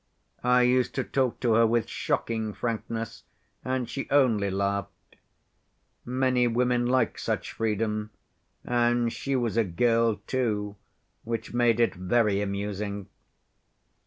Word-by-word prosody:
I 125 0 +4
used 125 0 +2
to - - 0
talk 130 -3 0
to 120 -3 +3
her 115 +1 +5
with 115 -1 +1
shocking 110 -2 -2
frankness, 115 0 -4 0.4
and 130 -1 -1
she 135 - -5
only 115 -8 +3
laughed. 100 0 -3 0.9
Many 125 0 +1
women 120 +1 +1
like 130 +1 +1
such - - -2
freedom, 105 -1 -1 0.6
and 120 -1 +1
she 140 0 -2
was 120 -3 0
a 115 - +5
girl 115 +4 +2
too, 105 -5 -1 0.5
which 115 0 -4
made 120 -2 +3
it 115 - +3
very 100 +2 +1
amusing. 100 0 -3
115 Hz, 125 wpm, -27 LUFS, 105-125 Hz, 0.9 s, her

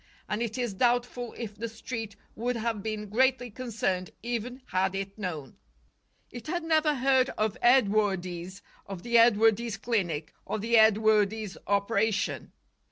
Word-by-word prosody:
And 210 +2 -2
it 235 0 -3
is 240 -4 -2
doubtful 245 +2 0
if 215 -3 -6
the 230 +2 -5
Street 225 -2 -6 0.2
would 245 +3 -2
have 230 -2 -2
been 215 0 -4
greatly 245 +2 +1
concerned 210 -6 -2
even 240 +2 -4
had 185 +1 0
it 195 0 -4
known. 165 - -6 0.7
It 240 +4 -9
had 345 +1 -2
never 315 -2 +2
heard 265 0 +3
of 215 -1 0
Edwardes, 200 -6 +2 0.2
of 195 -3 -7
the 235 -1 +4
Edwardes 225 0 +4
clinic 180 -9 -2
or - - -3
the 230 +3 0
Edwardes 220 -1 +3
operation. 200 +1 0
220 Hz, 140 wpm, -28 LUFS, 200-240 Hz, 0.7 s, the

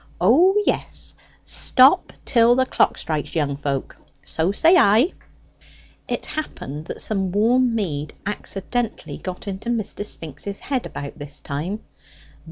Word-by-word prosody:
O 320 - +5
yes; - - -1 0.3
stop 270 +8 +4
till 235 -1 +5
the 260 0 +3
clock - - +2
strikes, 155 0 -3
young 145 -3 0
folk 140 -1 -3 0.3
so 165 +4 0
say 325 - +5
I." 235 - +5 1.0
It - - -3
happened 155 - -5
that - - -5
some 195 -4 -1
warm 235 +4 +3
mead 155 -9 -2
accidentally 210 +3 -3
got 185 +2 -7
into 200 +4 -4
Mr. 220 -3 -2
Spinks's 165 +1 -4
head 260 -3 -2
about 140 +2 -7
this 145 0 -6
time. 165 +9 -4
200 Hz, 130 wpm, -22 LUFS, 155-245 Hz, 1.0 s, O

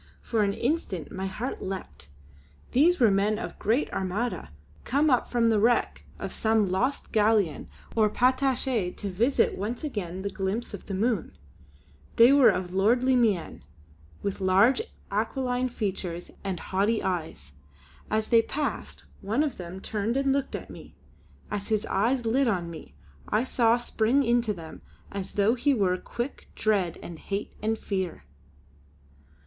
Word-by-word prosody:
For 225 -2 0
an 200 -1 +2
instant 240 - -2
my 190 +1 -3
heart 235 +7 -4
leapt; 75 - -6 0.6
these 330 +8 +4
were 230 -5 +5
men 205 +2 +2
of - - -4
the - - -22
great 230 +8 +1
Armada, 195 - -2 0.3
come 290 +3 +2
up 250 - +2
from 230 -2 +2
the 215 - +3
wreck 235 +3 +1
of - - -5
some 220 -2 +2
lost 255 +10 -1
galleon 210 -7 +2 0.3
or 215 -2 +4
patache 255 -5 +1
to 200 - -4
visit 235 +9 +2
once 220 +7 -4
again 190 - -4
the 200 - -2
glimpses 195 +5 -3
of 200 - -8
the 195 - -3
Moon. 220 -1 -1 0.8
They 240 +4 +7
were 280 -3 +7
of 180 0 -2
lordly 245 +7 +3
mien, 210 - +1 0.6
with 200 0 -3
large 195 - +4 0.3
aquiline 250 +4 0
features 190 -6 -4
and 190 -3 -3
haughty 205 +4 0
eyes. 160 - -3 0.6
As 215 0 0
they 230 -2 +6
passed, 290 +5 -4 0.2
one 225 +9 +1
of 290 -5 -3
them 180 +1 -7
turned 215 +5 -2
and 275 0 +2
looked 275 -1 -1
at - - -7
me. - - -12 0.6
As 205 -1 -3
his 215 -1 0
eyes 235 +5 +1
lit 255 +4 +2
on 175 -6 -1
me, 75 - -11 0.3
I 215 +3 +2
saw 235 -2 +3
spring 240 +3 +1
into 235 -2 +2
them, 165 -5 -8 0.3
as 195 -2 -5
though 205 +3 +3
he 275 +3 +2
were 190 -5 +2
quick, 240 +8 -6
dread, 195 -6 +1
and 170 -2 -8
hate, 200 +1 -4
and 220 +1 0
fear. 190 - -3
215 Hz, 155 wpm, -27 LUFS, 190-245 Hz, 0.8 s, They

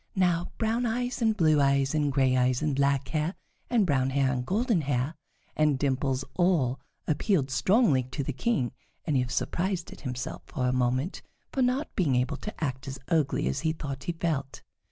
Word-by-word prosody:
Now 175 -2 +1
brown 230 +2 +1
eyes 245 +2 -2
and 220 -2 +2
blue 155 -4 +4
eyes 140 0 +2
and 150 -2 +1
gray 130 -2 +3
eyes 125 +2 +2
and 150 -3 +1
black 140 -1 +1
hair 155 +3 -1 0.3
and 230 -4 +3
brown 135 -5 +2
hair 135 -1 +2
and 125 -1 -2
golden 210 - +1
hair 140 +1 -1 0.4
and 150 -3 +3
dimples 135 -1 0
all 160 -9 +2 0.3
appealed 150 - +1
strongly 185 - +3
to 140 - -3
the 135 - -3
King, 135 - 0 0.3
and 150 - 0
he 130 - +3
was 125 - -4
surprised 180 -1 -1
at - - -14
himself 125 -2 -4
for 130 - -2
a 125 - +1
moment 130 +6 0 0.3
for 265 - -1
not 255 +4 0
being 150 -9 +2
able 125 +3 0
to 210 -2 -6
act 130 -1 -3
as 135 0 -5
ugly 155 - +1
as 65 - -1
he 160 - 0
thought 140 -4 -6
he - - 0
felt. 155 -6 -3
145 Hz, 195 wpm, -28 LUFS, 130-180 Hz, 0.4 s, blue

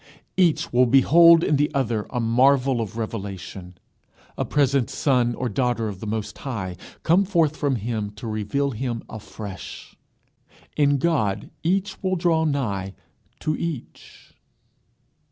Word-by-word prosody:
Each 175 -9 +2
will 125 +1 +5
behold 165 +6 +6
in 150 - +2
the 145 +2 +1
other 115 -6 -1
a 125 - -3
marvel 125 +2 +3
of 110 0 -6
revelation, 95 -4 -6 0.6
a - - -1
present 140 -3 +1
son 125 -4 +1
or 125 - -2
daughter 120 0 0
of 100 -3 -6
the 110 - -7
Most 110 0 -4
High, 100 -9 -4 0.3
come 175 +5 +4
forth 165 -6 +1
from 145 -3 0
him 110 -2 -3
to 105 - -9
reveal 110 +6 -1
him 120 -1 -4
afresh. 105 -3 -9 0.8
In 145 -1 +3
God 135 -10 0
each 190 +4 -1
will 185 -1 0
draw 165 -2 +2
nigh 100 -10 -2 0.5
to 155 0 0
each. 160 -7 -7
125 Hz, 135 wpm, -23 LUFS, 110-150 Hz, 0.8 s, behold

